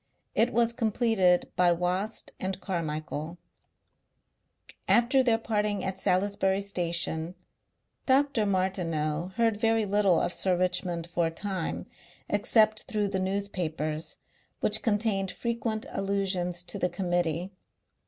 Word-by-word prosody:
It 235 +2 +3
was 235 0 +2
completed 220 -6 +2
by 180 0 +4
Wast 180 +5 -2
and 190 0 -3
Carmichael.... 155 -2 -4 1.5
After 240 +3 +4
their 235 -3 +3
parting 210 -3 -1
at 190 0 -3
Salisbury 195 +1 +1
station 170 -3 -2 0.7
Dr. 265 -5 +3
Martineau 175 -4 -1
heard 225 -2 +2
very 225 0 +2
little 200 -3 +3
of 175 - -1
Sir 185 -2 +1
Richmond 180 -2 0
for 170 -1 0
a - - -1
time 185 0 -4 0.4
except 215 +1 +3
through 210 -2 -1
the 190 -1 -1
newspapers, 165 -5 -2 0.4
which 215 +1 +3
contained 205 -3 0
frequent 230 0 -3
allusions 190 -3 -1
to 175 - -5
the 180 - +1
Committee. 175 -1 -1
190 Hz, 115 wpm, -28 LUFS, 175-215 Hz, 1.5 s, by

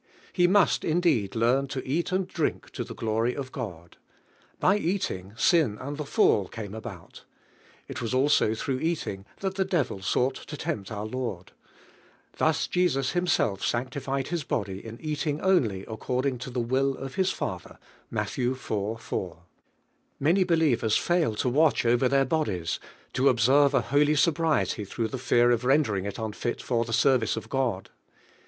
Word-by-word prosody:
He 175 -1 +4
must 195 +1 +3
indeed 155 - +1
learn 125 +5 +2
to 135 -2 -5
eat 165 +7 -1
and 185 0 0
drink 160 -4 -2
to - - -4
the - - -9
glory 115 +2 0
of 135 -2 -5
God. 90 -9 -7 0.6
By 190 - +4
eating, 130 - -2
sin 155 - +3
and 145 +1 -5
the 150 - -4
fall 100 -7 +3
came 105 -2 -7
about, 110 -5 -9 0.6
ft - - -6
was 115 - -3
also 130 -4 +3
through 130 +3 -2
eat 165 +1 -1
ing 95 0 -6 0.2
that 190 -1 -2
the 190 - +3
devil 165 - -1
sought 125 +7 +1
to 150 +3 -9
tempt 100 -5 -4
our 105 0 -4
I. - - -6
onl. 115 -8 -4 0.9
Thus - - +2
Jesus 150 -8 +1
Himself 175 - +1
sanctified 135 +2 -2
His 170 -2 -2
body 100 -7 -3
in 115 +1 -9
eating 150 -1 -2
only 125 - +1
according 125 +3 -2
to 130 - -6
the 125 0 -3
will 130 +3 +1
of 135 0 -7
His 190 -1 +1
Father - - -5 0.3
(Matt. - - -3
iv. 130 +1 -2
&). 105 -3 -2 0.9
Many 170 +7 +3
believ 160 -8 +2
ers 110 -1 +3
fail 170 -10 +1
to 115 - -1
watoh 125 -3 +3
oyer 130 - +3
their 135 0 +3
bodies, 105 - -1 0.3
to 130 +2 +4
ob 125 -3 +1
serve 140 +4 +5
a - - +4
holy 145 +4 +2
sobriety 150 - +1
through 110 +3 -3
the 130 - -5
fear 120 -1 +3
of 120 0 +1
rendering 125 -8 +2
it 100 - -4
unfit 110 +1 -3
for 120 -2 0
the 115 - -6
service 115 -2 +3
of 110 - -6
God. 125 -8 -1
130 Hz, 175 wpm, -27 LUFS, 110-150 Hz, 0.9 s, serve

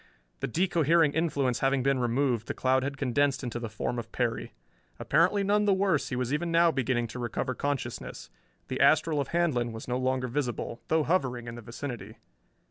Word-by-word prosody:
The - - -2
de 180 +10 +1
cohering 165 -2 +3
influence 145 -7 0
having 135 -1 +1
been 135 -1 +2
removed, 120 -1 0
the - - -3
cloud 130 0 +2
had 140 +1 -3
condensed 140 +1 +1
into 120 -1 -3
the 115 -2 -5
form 120 +3 -3
of 115 - -8
Perry. 120 -2 -2 0.5
Apparently 195 +4 +2
none 205 +1 +2
the 200 -2 +4
worse, 190 -6 +1
he 125 - -2
was 125 +1 -1
even 170 +3 -1
now 170 0 +5
beginning 125 -4 0
to 125 - -7
recover 120 +2 -2
consciousness. 130 -2 -4 0.4
The 130 - -4
astral 150 +2 +4
of 140 - -4
Handlon 150 -9 +1
was 110 0 -8
no 125 0 -1
longer 130 0 0
visible, 120 -2 -3
though 160 -1 +2
hovering 130 -8 0
in 115 - -5
the 120 - -8
vicinity. 115 -2 -7
130 Hz, 195 wpm, -28 LUFS, 120-155 Hz, 0.5 s, now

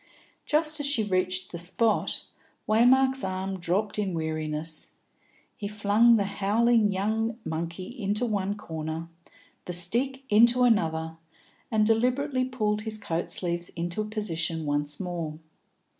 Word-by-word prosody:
Just 305 0 +1
as 290 - -1
she 280 -6 +1
reached 185 -2 -1
the 170 - -5
spot, 190 +5 +1 0.4
Waymark's 260 +4 +4
arm 190 0 -3
dropped 190 +5 -1
in 195 -4 -1
weariness; 155 0 -3 0.6
he 205 - -5
flung 210 +3 +4
the 205 - +2
howling 210 +3 +2
young 220 +4 -1
monkey 170 +3 -4
into 210 +4 0
one 205 -3 -1
corner, 160 -2 -5 0.6
the 180 - -4
stick 245 +10 0
into 235 +2 +5
another, 160 -8 +1 0.5
and 215 -2 +2
deliberately 255 +4 +1
pulled 215 -5 -1
his 215 0 -2
coat 170 -4 -3
sleeves 175 0 -2
into 175 +4 -2
position 170 -7 -2
once 145 0 0
more. 170 -4 -4
200 Hz, 130 wpm, -27 LUFS, 170-225 Hz, 0.6 s, into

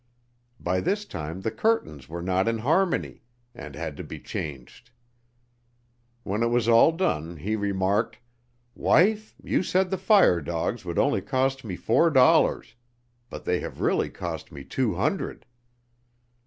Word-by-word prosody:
By 90 +1 -1
this 205 - -1
time 80 - -6
the 110 - -2
curtains 105 - -1
were 85 +1 -5
not 95 +3 +1
in 115 0 +1
harmony, 165 - 0 0.3
and 75 -2 -9
had 80 -1 -5
to - - -6
be - - -8
changed. 75 - -7 1.3
When 105 0 -2
it 115 - +3
was 120 -1 +1
all 115 +7 +6
done 85 - -2
he 105 +8 -2
remarked: 100 -1 0 0.6
'Wife, 215 +5 +2
you - - +1
said 185 0 +1
the 190 - -1
fire 190 - +5
dogs 85 +8 -3
would 85 -1 -4
only 145 - +2
cost 135 0 -1
me 100 -5 -5
four 165 - +3
dollars, 130 -4 +4 0.6
but - - -9
they - - +1
have - - -7
really - - +1
cost - - -6
me 70 - -9
two - - -1
hundred.'" - - -2
110 Hz, 150 wpm, -26 LUFS, -, 1.3 s, all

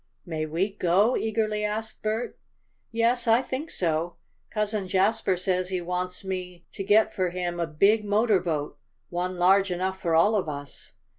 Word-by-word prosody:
"May 160 -3 -3
we 175 +6 -1
go?" 200 +7 +3
eagerly 215 -1 -1
asked 215 +1 -3
Bert. 220 +3 -3 0.5
"Yes, 230 +2 +1
I 230 +3 +4
think 265 +5 -4
so. 165 0 -1 0.3
Cousin 210 -2 -1
Jasper 190 0 +2
says 185 0 0
he 185 -1 -1
wants 180 +1 -3
me 180 -2 -5
to 195 - -5
get 210 +3 +4
for 185 -2 0
him 175 -1 -3
a 170 - 0
big 200 +8 +3
motor 210 0 +3
boat 155 -4 -3 0.3
one 180 +1 -3
large 190 +2 +4
enough 185 +1 -2
for 165 -2 +1
all 185 +7 +5
of 195 -7 0
us. 145 -2 -8
190 Hz, 165 wpm, -26 LUFS, 175-215 Hz, 0.5 s, all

